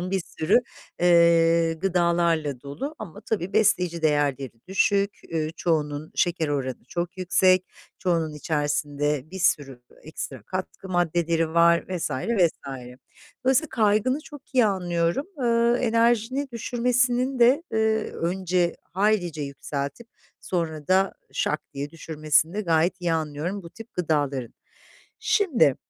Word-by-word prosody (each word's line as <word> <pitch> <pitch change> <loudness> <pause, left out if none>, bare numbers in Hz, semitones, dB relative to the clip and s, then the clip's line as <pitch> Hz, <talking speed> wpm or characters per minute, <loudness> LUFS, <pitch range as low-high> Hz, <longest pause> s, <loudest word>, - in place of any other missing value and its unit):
ımm, 180 +1 -4
bir 195 -1 0 0.2
sürü, 160 +8 +4 0.4
eee, 170 -1 +5
gıdalarla 170 -5 +1
dolu 205 - -6
ama 205 -1 -9
tabii 200 -4 -3
besleyici 180 -5 +2
değerleri 145 -4 +1 0.2
düşük. 200 +1 +1
Ü 155 -1 -1
çoğunun 150 -2 -1
şeker 170 -3 +1
oranı 130 -4 -3
çok 175 +2 -4
yüksek. 185 0 +3 0.3
Çoğunun 165 -4 0
içerisinde 145 -1 -1
bir 190 - -7
sürü 135 -8 0 0.2
ekstra 140 -6 -7
katkı 185 - -6
maddeleri 170 -2 0
var 170 0 +5
vs. 175 -2 -2
vs. 180 - +1 0.9
Dolayısıyla 265 +4 +3
kaygını 220 +5 +2
çok 295 -4 -14
iyi 245 -4 +5
anlıyorum. 175 - 0
Iıı, 235 -1 +3
enerjini 235 +3 +1
düşürmesinin 250 +2 0
de, 255 +7 +5
eee 220 0 +1
önce 175 0 0 0.2
haylice 185 -5 +1
yükseltip 140 +8 -5 0.3
sonra 160 -4 -3
da 190 +1 +3 0.2
şak 150 - 0
diye 140 +1 -4
düşürmesini 155 +1 0
de 215 - -1
gayet 170 0 +1
iyi 170 -2 0
anlıyorum 160 +5 -3
bu 170 - -11
tip 225 0 -13
gıdaların. 145 -8 -1 0.6
Şimdi, 410 - +3
175 Hz, 125 wpm, -25 LUFS, 155-215 Hz, 0.9 s, eee